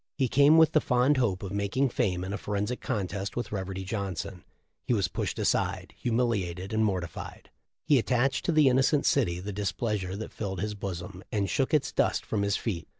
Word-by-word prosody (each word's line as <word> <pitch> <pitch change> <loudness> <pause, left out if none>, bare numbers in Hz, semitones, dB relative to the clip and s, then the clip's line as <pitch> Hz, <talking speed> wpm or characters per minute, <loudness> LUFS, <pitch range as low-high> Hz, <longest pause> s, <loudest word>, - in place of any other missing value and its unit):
He 135 -2 +2
came 145 +5 +6
with 160 -1 +6
the 155 - +3
fond 125 +4 +3
hope 105 -8 0
of 95 - -5
making 100 +7 0
fame 95 -8 0
in 95 +2 -4
a - - -2
forensic 105 +4 -2
contest 100 -4 -3
with 120 - -3
Reverdy 95 -1 -4
Johnson. 95 -2 -4 0.4
He 120 - +1
was 100 -4 +1
pushed - - -3
aside, - - 0
humilated 105 -6 -1
and 110 0 +2
mortified. 90 -6 -4 0.3
He 145 -4 +5
attached 125 +3 +1
to - - +2
the 155 -3 +5
innocent 135 +3 +3
city 90 -11 +2
the 100 +3 -5
displeasure 100 -1 -2
that 110 +2 -7
filled 95 -4 -4
his 105 +2 -2
bosom, 95 -1 -6
and 100 -2 0
shook 135 +6 0
its 150 -3 +2
dust - - +1
from 105 - -1
his 100 0 +1
feet." 95 -8 -4
105 Hz, 195 wpm, -28 LUFS, 95-125 Hz, 0.4 s, came